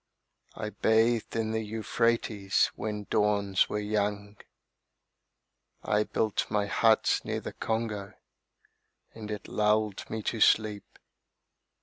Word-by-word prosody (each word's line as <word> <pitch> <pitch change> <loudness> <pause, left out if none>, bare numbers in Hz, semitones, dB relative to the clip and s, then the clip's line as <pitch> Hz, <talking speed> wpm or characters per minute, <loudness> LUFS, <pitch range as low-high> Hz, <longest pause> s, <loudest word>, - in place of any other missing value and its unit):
I 105 - -5
bathed 110 +1 +2
in 110 -1 -1
the 110 0 -1
Euphrates 110 -2 0
when 105 -1 -4
dawns 100 -2 +2
were - - -2
young. 105 -1 -2 1.5
I 105 0 +1
built 110 -2 -1
my 105 -1 +1
hut 110 +2 +3
near - - -3
the - - -7
Congo 110 -3 -3 1.0
and 110 -2 -8
it 105 -1 -5
lulled 105 -1 0
me 110 -1 -4
to 115 - -2
sleep. 105 -2 +2
105 Hz, 110 wpm, -29 LUFS, 105-110 Hz, 1.5 s, hut